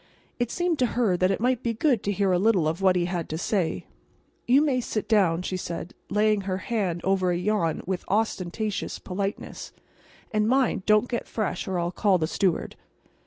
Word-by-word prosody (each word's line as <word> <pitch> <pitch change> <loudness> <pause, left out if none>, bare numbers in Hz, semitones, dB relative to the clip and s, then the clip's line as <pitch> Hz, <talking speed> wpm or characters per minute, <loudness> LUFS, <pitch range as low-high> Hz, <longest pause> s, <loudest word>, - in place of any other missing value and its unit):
It 240 -1 0
seemed 350 0 -1
to 250 - +3
her 220 -7 +3
that 185 +1 +2
it 195 - 0
might 250 +1 +1
be 235 -2 -1
good 245 -2 +2
to 200 - +1
hear 200 -1 +1
a 180 - +3
little 195 -6 +3
of 165 +4 -2
what 190 -1 +4
he 175 -1 +1
had 175 -2 -3
to 155 - -3
say. 175 -2 -1 0.6
"You 265 +5 +5
may 265 -4 +1
sit 215 -2 -3
down," 180 -6 +3
she 185 - -2
said, 170 -1 -5 0.2
laying 210 0 +2
her 190 -1 -2
hand 190 -4 -2
over 190 -1 +2
a 175 - +1
yawn 180 -3 0
with 185 -1 -3
ostentatious 210 0 -1
politness; 195 +2 -5 0.6
"and—mind—don't 215 -1 +2
get 240 -1 -3
fresh 210 -5 -3
or 190 -1 -1
I'll 175 0 -1
call 195 0 +2
the 160 - 0
steward." 180 +1 -1
195 Hz, 190 wpm, -26 LUFS, 180-225 Hz, 0.6 s, You